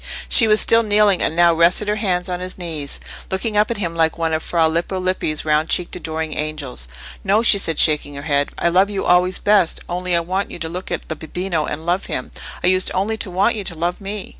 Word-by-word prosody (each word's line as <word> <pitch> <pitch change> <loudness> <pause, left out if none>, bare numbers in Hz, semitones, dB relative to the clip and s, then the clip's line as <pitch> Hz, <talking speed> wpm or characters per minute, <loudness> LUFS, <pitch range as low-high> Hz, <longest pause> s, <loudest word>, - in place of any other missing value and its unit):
She 225 - +8
was 215 0 +5
still 230 0 +5
kneeling, 210 -3 +3
and 160 - -1
now 170 0 +5
rested 170 +5 +3
her 210 +1 0
hands 180 -4 -1
on 180 -1 -3
his 185 0 -6
knee, 160 -5 -4 0.4
looking 210 +3 -3
up 210 +1 +3
at 235 - -2
him 170 -4 -3
like 160 -1 +1
one 165 -1 -1
of 160 - 0
Fra 165 -1 +1
Lippo 170 +4 -2
Lippi's 185 -5 -2
round 155 +1 +1
cheeked 180 - 0
adoring 160 -2 -4
angels. 150 - -5 0.4
"No," 205 +3 +2
she 205 -3 +4
said, 165 -5 -1
shaking 150 -2 +2
her 140 - -7
head; 145 -1 0
"I 170 - +1
love 190 +4 +3
you 200 -2 -3
always 180 +1 +3
best, 205 -5 +2
only 180 0 -2
I - - +3
want 185 +4 -3
you - - -8
to 165 -1 -5
look 180 +3 -6
at - - -4
the 160 - -3
bambino 165 +1 -3
and 155 +2 -5
love 180 +3 -1
him; - - -5 0.3
I - - 0
used 185 0 +3
only 200 +4 0
to 215 - -3
want 195 +6 +1
you 210 - -4
to 175 - -4
love 175 +4 -3
me." 200 0 -6
180 Hz, 240 wpm, -19 LUFS, 160-195 Hz, 0.4 s, She